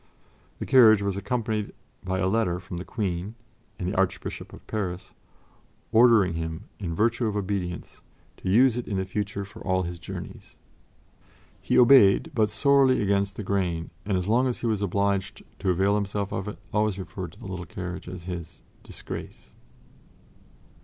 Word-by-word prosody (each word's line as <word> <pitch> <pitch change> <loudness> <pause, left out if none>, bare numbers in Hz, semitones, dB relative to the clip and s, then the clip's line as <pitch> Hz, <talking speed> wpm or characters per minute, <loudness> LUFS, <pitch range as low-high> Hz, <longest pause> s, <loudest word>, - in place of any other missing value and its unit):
The - - -5
carriage 110 -6 +6
was 100 -1 -1
accompanied 110 -1 -2 0.3
by 95 0 -2
a 95 - +1
letter 95 -4 +1
from 90 0 -8
the 90 - -5
Queen 100 -1 -3 0.4
and 90 - -3
the 95 - -2
Archbishop 95 0 -2
of - - -13
Paris 95 -4 -4 0.8
ordering 110 -5 +5
him 80 +2 -4 0.2
in 85 -5 -3
virtue 115 +4 +1
of 105 - -2
obedience 95 -3 -4 0.4
to - - -4
use 120 +4 +5
it 125 - -4
in 100 - -2
the 95 - -1
future 100 +1 -3
for 110 +3 -13
all 95 -1 +1
his 85 0 -5
journeys. 80 - -9 1.1
He - - +1
obeyed, 120 -6 +6
but 110 -2 +2
sorely 135 +4 +4
against 100 -1 +1
the 105 - -5
grain, 90 -4 -1
and 100 -2 0
as 90 0 -2
long 120 +4 +3
as 125 - -1
he - - -3
was 110 -3 0
obliged 100 +1 -1 0.2
to 95 - -1
avail 95 +3 +3
himself 100 -1 -1
of 95 +2 -3
it 105 - -6 0.2
always 105 -2 +1
referred 90 0 -6
to - - -17
the - - -11
little 95 -3 -6
carriage 90 +2 -6
as 90 -1 -8
his 85 -2 -7 0.2
"disgrace." - - -9
100 Hz, 170 wpm, -26 LUFS, 90-110 Hz, 1.1 s, carriage